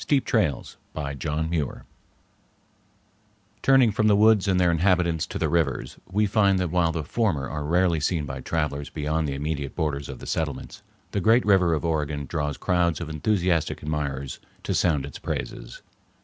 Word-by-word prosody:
XXIII. 145 - +2
The - - -7
Rivers 75 - -1 0.2
of 70 -1 -4
Oregon 80 -1 -2 1.8
Turning 135 -4 +5
from 110 +1 +1
the 105 - +5
woods 105 -1 +5
and 95 -2 +2
their 90 -1 +4
inhabitants 85 -1 +2
to - - -5
the - - 0
rivers, 70 -7 -1
we 105 +3 +2
find 100 -2 +3
that 90 -3 -1
while 85 -2 +2
the 80 -1 -3
former 75 - 0
are 75 +1 -4
rarely 85 +2 +2
seen 75 0 0
by 65 -2 -6
travelers 75 -3 -2
beyond 75 +1 -1
the 70 - -3
immediate 70 -1 -3
borders 75 -4 -2
of 65 - -6
the - - -10
settlements, - - -3 0.3
the 100 - -1
great 115 +5 +4
river 95 -5 +4
of 80 - -3
Oregon 75 -3 -1
draws 75 -2 -3
crowds 85 -2 +1
of 80 -3 -5
enthusiastic 85 +1 0
admirers 70 -3 -3 0.2
to - - -1
sound 75 -6 +1
its 70 - -9
praises. - - -5
80 Hz, 175 wpm, -25 LUFS, 75-90 Hz, 1.8 s, Turning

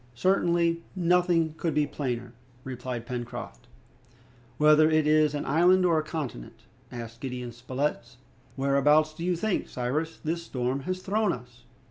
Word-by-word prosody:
"Certainly, 170 0 +2
nothing 175 -2 +2
could 165 -4 -2
be 150 -1 +3
plainer," 125 -5 -4 0.3
replied 125 -2 -5
Pencroft. 120 - -6 0.9
"But, 150 - +1
whether 155 +1 +7
it 155 -1 +3
is 155 -1 +3
an 145 - -3
island 180 +3 +4
or 165 -3 +3
a - - -2
continent," 150 - -6 0.3
asked 115 -1 -8
Gideon 125 -2 -5
Spilett, 125 0 -3 0.4
"whereabouts 145 +3 +3
do 165 - -7
you 180 0 +1
think, 210 +3 -1
Cyrus, 150 +7 -2
this 165 +2 -3
storm 130 -4 -2
has 185 0 -3
thrown 210 +2 +1
us?" 125 0 -9
150 Hz, 145 wpm, -27 LUFS, 125-170 Hz, 0.9 s, whether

